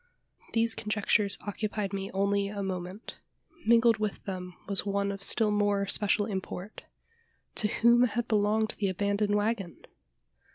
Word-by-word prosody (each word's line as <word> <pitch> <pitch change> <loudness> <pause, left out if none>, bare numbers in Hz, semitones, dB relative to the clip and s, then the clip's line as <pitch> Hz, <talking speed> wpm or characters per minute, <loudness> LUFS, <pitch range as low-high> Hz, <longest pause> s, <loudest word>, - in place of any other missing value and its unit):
These 230 0 +2
conjectures 210 -1 +1
occupied 205 -1 -3
me 195 0 -3
only 200 +1 0
a 200 0 -4
moment. 185 +2 -6 0.5
Mingled 230 0 +5
with 215 -2 -3
them 180 -2 -6
was 200 -1 +2
one 200 0 -1
of 200 0 -7
still 210 +2 +4
more 205 -1 +1
special 205 +1 +2
import: 195 -1 -6 0.7
to 215 - +1
whom 235 +2 +4
had 240 0 -2
belonged 215 0 +1
the 200 -2 +1
abandoned 200 +2 0
waggon? 205 -4 -1
205 Hz, 135 wpm, -29 LUFS, 195-215 Hz, 0.7 s, Mingled